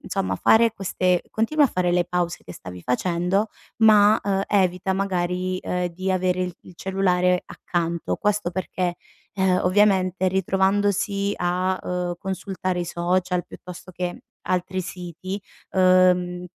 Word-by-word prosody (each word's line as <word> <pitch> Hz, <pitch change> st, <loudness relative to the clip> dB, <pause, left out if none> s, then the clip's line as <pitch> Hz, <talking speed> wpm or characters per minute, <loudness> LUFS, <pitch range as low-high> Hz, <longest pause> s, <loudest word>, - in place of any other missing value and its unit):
insomma, 95 Hz, 0 st, -2 dB
fare 225 Hz, -, +4 dB
queste 185 Hz, -3 st, 0 dB
continua 290 Hz, +8 st, +1 dB
a -, -, -7 dB
fare 180 Hz, -4 st, 0 dB
le 175 Hz, 0 st, +2 dB
pause 175 Hz, -1 st, -2 dB
che 90 Hz, -, -10 dB
stavi 90 Hz, 0 st, -10 dB
facendo, 180 Hz, -, 0 dB, 0.3 s
ma, 210 Hz, -1 st, +6 dB
uhm, 195 Hz, -1 st, 0 dB
evita 185 Hz, -1 st, +1 dB
magari, 185 Hz, -1 st, -1 dB
uhm, 180 Hz, 0 st, -1 dB
di, 190 Hz, +1 st, -2 dB
avere 185 Hz, 0 st, +1 dB
i 180 Hz, 0 st, -3 dB
il 180 Hz, -, -14 dB
cellulare 180 Hz, -1 st, +1 dB
accanto. 170 Hz, -1 st, -2 dB
Questo 205 Hz, -4 st, 0 dB
perché, 180 Hz, -1 st, -2 dB, 0.4 s
uhm, 190 Hz, -1 st, +2 dB
ovviamente, 185 Hz, -1 st, +3 dB
ritrovandosi 200 Hz, +2 st, +1 dB
a, 180 Hz, +1 st, 0 dB
uhm, 180 Hz, -1 st, -3 dB
consultare 185 Hz, -1 st, -3 dB
i 175 Hz, -, -2 dB
social 180 Hz, +1 st, -1 dB
piuttosto 180 Hz, 0 st, -11 dB
che 180 Hz, 0 st, -4 dB, 0.2 s
altri 185 Hz, +1 st, -1 dB
siti, 185 Hz, +1 st, -6 dB, 0.3 s
uhm, 180 Hz, -1 st, +3 dB
185 Hz, 135 wpm, -23 LUFS, 180-195 Hz, 0.4 s, ma